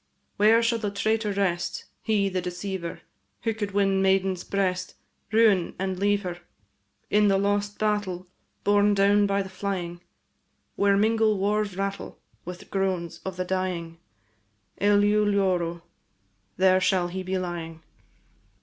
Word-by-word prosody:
Where 220 +3 +5
shall 230 0 +1
the 210 -2 -2
traitor 215 +1 0
rest, 190 -3 -1 0.2
He, 210 -3 +1
the 185 -1 -2
deceiver, 180 0 -5 0.4
Who 225 -1 0
could 210 -2 -3
win 195 -1 +1
maiden's 190 -1 +1
breast, 185 -2 -2 0.4
Ruin, 215 -5 +3
and 190 -1 -3
leave 205 +1 +1
her? 175 -1 -5 0.7
In 210 0 +4
the 195 -1 +3
lost 205 +1 0
battle, 205 -4 -1 0.4
Borne 205 0 +3
down 200 +1 +4
by 200 0 +1
the - - -8
flying, 185 -3 -4 0.7
Where 200 0 +3
mingle 220 0 +2
war's 205 0 0
rattle 195 0 -4 0.3
With 180 +1 -9
groans 190 -4 -2
of 190 -1 -5
the 185 - -2
dying. 180 -3 -3 0.8
Eleu 205 +1 +4
loro, 185 -4 +1
&c. 170 - -16 0.8
There 185 0 +4
shall 185 -1 +2
he 190 +2 -4
be 185 +1 -2
lying. 165 -3 -5
195 Hz, 140 wpm, -26 LUFS, 185-205 Hz, 0.8 s, Where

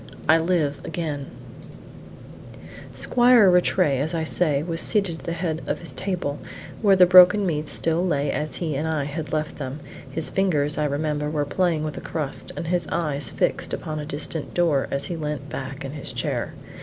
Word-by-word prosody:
I 160 +2 +6
LIVE 160 -4 0
AGAIN 150 -5 -4 1.6
Squire 240 -5 +5
Rattray, 180 -5 +3
as 155 +5 -1
I 160 - -1
say, 155 -3 +1
was 165 0 -2
seated 195 -6 0
at - - -14
the 170 - -2
head 165 -2 -2
of - - -1
his 165 -6 -7
table, 170 -4 -3 0.4
where 200 -3 +5
the 185 -1 +7
broken 185 +3 +7
meats 155 -4 -1
still 165 +1 0
lay 145 -5 0
as 150 0 -1
he 160 -5 -2
and 150 +4 -1
I 155 -3 0
had 150 +2 -5
left 155 -1 -2
them; 135 0 -5 0.3
his 155 +3 -1
fingers, 155 -7 +1
I 150 - +1
remember, 150 +1 -1
were 150 -1 -1
playing 165 0 0
with 155 -1 -4
a - - -5
crust, 150 -4 -5
and 165 - -4
his 175 -3 0
eyes 145 -6 -2
fixed - - -1
upon 155 -1 -5
a 150 - -5
distant 150 +1 -5
door, 165 -6 +2
as 140 0 -1
he 175 - -3
leant 150 -3 -4
back 135 0 -6
in 135 - -5
his 145 -1 -3
chair. - - -2
155 Hz, 190 wpm, -24 LUFS, 145-175 Hz, 1.6 s, the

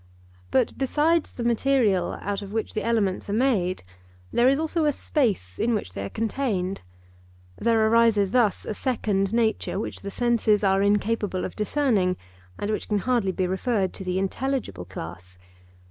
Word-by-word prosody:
But 255 -3 +1
besides 300 +4 +2
the 240 - -5
material 235 -6 +2
out 200 0 -2
of 200 -1 -8
which 220 0 -2
the 215 - -1
elements 210 -5 0
are - - -1
made, 210 -7 +1 0.5
there 240 +2 +5
is 275 - +3
also 320 +1 0
a 295 - +4
space 205 - -1
in 235 0 +2
which 150 - -4
they 100 - -4
are 100 - -4
contained. 215 - -2 0.7
There 225 -1 +2
arises 220 -4 +4
thus 235 -5 +2
a - - -3
second 205 -5 0
nature 220 -3 0
which - - -5
the 200 - -5
senses 225 -2 +2
are 195 0 +3
incapable 205 -1 +1
of - - -6
discerning 210 -6 +1 0.4
and 205 - -2
which 215 - -3
can 210 - +2
hardly 230 -2 +1
be 185 0 -1
referred 190 +1 0
to - - -7
the 185 0 -1
intelligible 225 - -2
class. 90 0 -9
215 Hz, 165 wpm, -25 LUFS, 190-240 Hz, 0.7 s, there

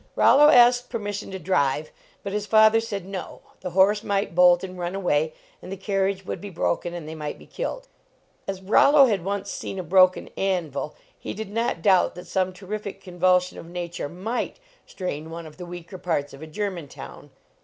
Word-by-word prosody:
Rollo 295 +2 +6
asked 245 -2 +6
permission 205 -3 -4
to 190 - -5
drive, 155 -5 0 0.3
but 200 - -4
his 210 0 -2
father 220 +1 +6
said 205 -5 -5
"No; 195 -1 -7 0.2
the 180 - -5
horse 195 +4 +3
might 200 -3 -1
bolt 180 0 +5
and 185 -1 -7
run 175 +1 -3
away, 160 -5 +1 0.3
and 185 - -9
the 195 - -4
carriage 195 -1 -1
would - - -5
be 205 - -7
broken 175 -1 -2
and 165 -3 -7
they 160 - -6
might 150 -2 -5
be - - -15
killed." - - -5 0.6
As 195 -1 -4
Rollo 275 +8 +6
had 205 -8 0
once 200 +1 -3
seen - - -5
a 185 - -3
broken 185 +2 +4
anvil, 170 -7 -2 0.2
he - - -7
did 215 -1 -6
not 230 -6 -1
doubt 190 -4 +4
that 180 0 -9
some 185 +1 0
terrific 200 +1 -6
convulsion 180 0 +1
of - - -10
nature 175 -2 -5
might 215 - -3 0.3
strain 160 -4 -5
one 165 0 -7
of 155 -1 -12
the 180 -1 -8
weaker 175 +1 -9
parts 145 -5 -2
of 135 - -12
a 160 - -8
German 180 -2 -4
town. - - -11
185 Hz, 195 wpm, -24 LUFS, 175-205 Hz, 0.6 s, Rollo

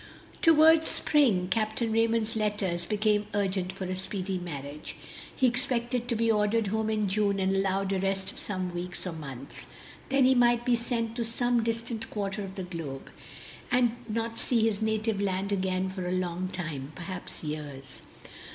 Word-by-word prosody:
Toward 320 0 +6
spring 235 -12 +3
Capt. 215 +3 0
Raymond's 225 -1 +1
letters 205 -5 -1
became 210 +1 +1
urgent 190 -2 0
for 190 0 -7
a 185 0 -2
speedy 190 0 -3
marriage. 150 -3 -6 0.4
He 260 - +2
expected 245 -1 0
to 240 - 0
be 230 0 +3
ordered 215 +1 +2
home 220 +1 0
in 215 -1 +1
June 200 0 +1
and 190 0 +2
allowed 195 0 +1
a 190 - +1
rest 195 0 -1
of - - -11
some 185 -3 -3
weeks 175 +1 -4
or 180 - -2
months. 140 -4 -8 0.4
Then 270 -1 +4
he 260 - +6
might 240 -1 +4
be 245 - +4
sent 230 -1 -2
to 235 - 0
some 240 +1 +1
distant 230 0 -3
quarter 200 0 -3
of 190 -1 -7
the 190 - -4
globe, 165 -7 -6 0.6
and 245 -2 +3
not 230 +1 -2
see 235 -3 +2
his 220 -2 +1
native 220 -1 0
land 195 0 -1
again 190 -1 0
for 185 -1 -4
a - - -1
long 185 0 -1
while, 160 -6 -3
perhaps 180 0 -7
years. 150 -3 -6
205 Hz, 170 wpm, -29 LUFS, 185-230 Hz, 0.6 s, Toward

